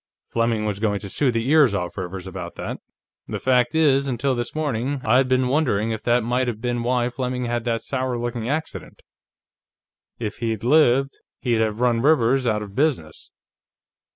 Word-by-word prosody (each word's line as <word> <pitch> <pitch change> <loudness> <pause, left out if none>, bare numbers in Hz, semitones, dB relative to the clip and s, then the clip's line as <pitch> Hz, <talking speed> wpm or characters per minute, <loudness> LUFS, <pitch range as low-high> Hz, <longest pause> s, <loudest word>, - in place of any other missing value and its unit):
Fleming 115 -2 0
was 105 -2 -2
going 105 -2 0
to 100 - -7
sue 140 +7 +1
the 115 0 -1
ears 145 -7 +5
off 90 -2 -3
Rivers 95 -1 -6
about 90 -2 -7
that; - - -5 0.5
the - - -3
fact 125 0 +2
is, 140 -3 +3
until 130 +1 0
this 120 +1 -3
morning, 140 -2 -1
I'd 125 +4 +4
been 130 0 +2
wondering 125 -6 +1
if 110 - -3
that 120 0 +2
mightn't 125 +2 0
have 115 -3 -3
been 120 0 -2
why 120 0 +1
Fleming 125 0 -3
had 120 0 -2
that 115 -1 -1
sour 130 -2 -2
looking 120 0 -3
accident. 155 +2 -4 1.1
If 105 -3 -4
he'd 115 -3 -3
lived, 135 0 +3 0.2
he'd 120 -3 +1
have 110 +1 -1
run 120 -2 +2
Rivers 135 -3 +3
out 105 -2 0
of 100 -2 -10
business." 130 - -1
120 Hz, 180 wpm, -23 LUFS, 110-130 Hz, 1.1 s, ears